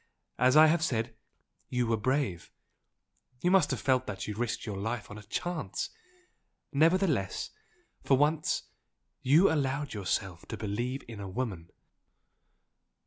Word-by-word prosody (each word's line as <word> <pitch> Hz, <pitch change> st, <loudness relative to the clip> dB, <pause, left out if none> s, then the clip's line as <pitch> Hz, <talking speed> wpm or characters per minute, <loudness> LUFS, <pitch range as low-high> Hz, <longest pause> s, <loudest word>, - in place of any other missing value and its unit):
As 130 Hz, +3 st, +5 dB
I 155 Hz, -, +10 dB
have 160 Hz, +1 st, +3 dB
said, 115 Hz, -5 st, -1 dB, 0.5 s
you 125 Hz, -1 st, +1 dB
were 115 Hz, -1 st, +2 dB
brave! 120 Hz, -, -1 dB, 0.9 s
you 180 Hz, -, +2 dB
must 190 Hz, -5 st, +5 dB
have -, -, -1 dB
felt 130 Hz, -1 st, +2 dB
that 100 Hz, -2 st, -5 dB
you 105 Hz, -, -2 dB
risked 120 Hz, +1 st, -2 dB
your 105 Hz, -3 st, -4 dB
life 110 Hz, +1 st, -3 dB
on 105 Hz, -, -7 dB
a -, -, -10 dB
chance! 170 Hz, -, -3 dB, 0.8 s
nevertheless, 160 Hz, -, +2 dB, 0.5 s
for 135 Hz, -, +4 dB
once, 150 Hz, +2 st, +1 dB, 0.6 s
you 155 Hz, +9 st, +5 dB
allowed 140 Hz, -1 st, -1 dB
yourself 95 Hz, -3 st, -2 dB
to -, -, -5 dB
believe 120 Hz, +6 st, -3 dB
in 115 Hz, -3 st, -8 dB
a 100 Hz, -1 st, -5 dB
woman!" 95 Hz, -6 st, -4 dB
125 Hz, 140 wpm, -30 LUFS, 105-150 Hz, 0.9 s, I